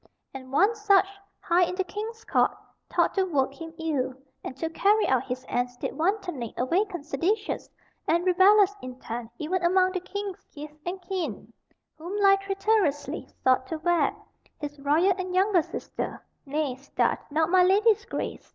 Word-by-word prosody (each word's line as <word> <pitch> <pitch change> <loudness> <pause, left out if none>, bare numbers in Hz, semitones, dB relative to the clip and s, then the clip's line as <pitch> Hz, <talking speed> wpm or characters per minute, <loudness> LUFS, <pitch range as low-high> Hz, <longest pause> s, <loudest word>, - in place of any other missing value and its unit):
And 260 -1 -9
one 395 +11 +4
such, 410 -3 +4 0.4
high 345 +1 +2
in 360 +1 +1
the 380 - 0
king's 440 +4 -7
court, - - +2 0.3
thought - - +2
to 385 - +2
work 280 -7 0
him 325 +3 -9
ill; 290 -6 -1 0.3
and 260 - -7
to 325 - -2
carry 415 +6 +3
out 260 -1 +2
his 255 0 -5
ends 245 0 -2
did - - -4
wantonly 350 - -2
awaken 350 - 0
seditious 370 +9 -1 0.4
and 340 +2 +2
rebellious 390 +2 +5
intent 245 -2 -6
even 345 +4 -2
among 370 +1 +4
the 370 - -2
king's 400 +1 -6
kith 300 0 -10
and 370 +2 -3
kin, 325 - -4 0.5
whom 350 +6 -5
lie 395 -1 +6
traitorously 390 -7 0 0.2
sought 260 0 +3
to 320 - -3
wed, 345 +2 +1 0.4
his 295 -1 -7
royal 310 +7 +3
and 365 0 -3
younger 380 -1 +4
sister, - - -5 0.3
nay, 290 -1 -1
start' 280 +2 -1
not 315 +2 +2
my 370 -1 +6
lady's 405 +4 +4
grace!" - - -5
345 Hz, 160 wpm, -26 LUFS, 285-390 Hz, 0.5 s, lie